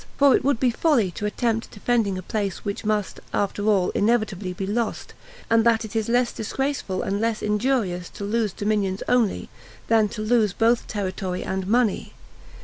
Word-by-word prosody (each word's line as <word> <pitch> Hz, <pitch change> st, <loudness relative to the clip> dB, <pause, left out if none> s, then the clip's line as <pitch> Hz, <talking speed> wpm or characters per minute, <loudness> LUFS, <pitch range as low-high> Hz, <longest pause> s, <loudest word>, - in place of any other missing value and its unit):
For 280 Hz, -2 st, +6 dB
it -, -, 0 dB
would 275 Hz, -4 st, +1 dB
be 250 Hz, -2 st, +3 dB
folly 235 Hz, -, +2 dB
to 210 Hz, +4 st, -3 dB
attempt 225 Hz, +1 st, -1 dB
defending 210 Hz, -3 st, 0 dB
a 185 Hz, -, -6 dB
place 200 Hz, +1 st, -3 dB
which 200 Hz, -1 st, -3 dB
must, 210 Hz, -2 st, -1 dB, 0.2 s
after 205 Hz, +1 st, -1 dB
all, 195 Hz, -4 st, +3 dB
inevitably 210 Hz, -4 st, 0 dB
be 185 Hz, +2 st, -4 dB
lost; 220 Hz, +3 st, -2 dB, 0.3 s
and 230 Hz, 0 st, +4 dB
that 230 Hz, -1 st, +3 dB
it 220 Hz, -, -10 dB
is 220 Hz, 0 st, 0 dB
less 245 Hz, 0 st, +2 dB
disgraceful 225 Hz, -4 st, -2 dB
and 200 Hz, +2 st, -1 dB
less 225 Hz, -1 st, -1 dB
injurious 210 Hz, -5 st, 0 dB
to -, -, -5 dB
lose 215 Hz, 0 st, 0 dB
dominions 205 Hz, -1 st, -1 dB
only, 245 Hz, -5 st, +1 dB, 0.4 s
then 220 Hz, -2 st, +4 dB
to 215 Hz, 0 st, -5 dB
lose 215 Hz, -3 st, +2 dB
both 230 Hz, +2 st, +2 dB
territory 185 Hz, -2 st, -3 dB
and 190 Hz, 0 st, -3 dB
money. 230 Hz, -1 st, +1 dB
215 Hz, 175 wpm, -24 LUFS, 200-235 Hz, 0.4 s, For